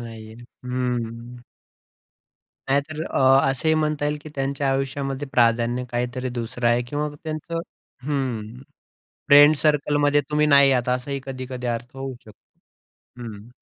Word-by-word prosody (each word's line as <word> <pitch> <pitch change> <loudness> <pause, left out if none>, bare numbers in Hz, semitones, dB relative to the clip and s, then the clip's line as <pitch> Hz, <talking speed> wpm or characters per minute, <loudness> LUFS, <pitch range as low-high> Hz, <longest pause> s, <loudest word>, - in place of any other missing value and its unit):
नाहीये. 110 -2 -9 0.3
हं. 125 -1 -3 1.3
नाहीतर 150 +3 0
अ, 135 +1 +4
असेही 160 +4 +1
म्हणता 150 -1 0
येईल, 150 0 -1
की 155 - -9
त्यांच्या 135 0 -1
आयुष्यामध्ये 135 +1 -2
प्राधान्य 120 +1 +2
काहीतरी 125 +1 -2
दुसरं 120 +1 -3
आहे 120 +1 +2
किंवा 150 +2 -2 0.2
त्यांचं 160 +2 -4 0.5
हं, 135 -6 -1 0.9
फ्रेंड 145 +2 +8
सर्कलमध्ये 145 -1 +2
तुम्ही 150 0 +2
नाही 140 -2 +6
आहात. 125 -1 0
असाही 135 +2 -5
कधी-कधी 130 -1 -6
अर्थ 120 +2 -4
होऊ 135 0 -5
शकतो. 110 - -16 0.8
हं. 110 -1 -9
135 Hz, 125 wpm, -23 LUFS, 120-145 Hz, 1.3 s, फ्रेंड